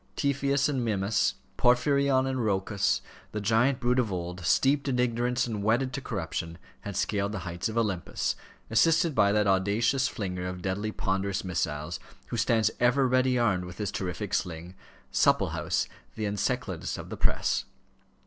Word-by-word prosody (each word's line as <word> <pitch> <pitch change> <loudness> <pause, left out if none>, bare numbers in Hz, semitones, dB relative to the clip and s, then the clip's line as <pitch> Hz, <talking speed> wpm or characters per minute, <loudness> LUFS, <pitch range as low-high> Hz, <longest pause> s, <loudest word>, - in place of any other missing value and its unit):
Typhoeus 140 0 +1
and 135 -4 -1
Mimas, 105 -1 +1 0.2
Porphyrion 130 +2 +3
and 130 -1 -1
Rhoecus, 100 -1 +1 0.3
the 105 - -2
giant 115 +6 +2
brood 125 0 +2
of 115 -5 0
old, 90 0 -4
steeped 140 - +3
in 130 -2 +1
ignorance 125 +1 +1
and 110 -4 -3
wedded 120 +5 +1
to 140 - -3
corruption, 85 -6 -4 0.2
had 100 -2 -6
scaled 100 0 0
the - - -2
heights 85 +4 -3
of 110 - -5
Olympus, 105 -7 -1 0.4
assisted 165 +6 +4
by 105 -4 +4
that 105 0 +2
audacious 105 +8 +2
flinger 90 -5 -4
of 90 -1 -6
deadly 100 +3 -2
ponderous 95 0 -1
missiles, 80 -2 -2 0.3
who 120 - -3
stands 115 -1 +2
ever 125 +2 +4
ready 130 0 +3
armed 95 -7 +1
with 90 0 -9
his 105 -2 -2
terrific 95 +1 -4
sling 85 0 -2 0.4
Supplehouse, - - +2 0.3
the 110 - -2
Enceladus 100 -1 -2
of - - -8
the - - -5
press. - - +1
110 Hz, 160 wpm, -28 LUFS, 95-125 Hz, 0.4 s, assisted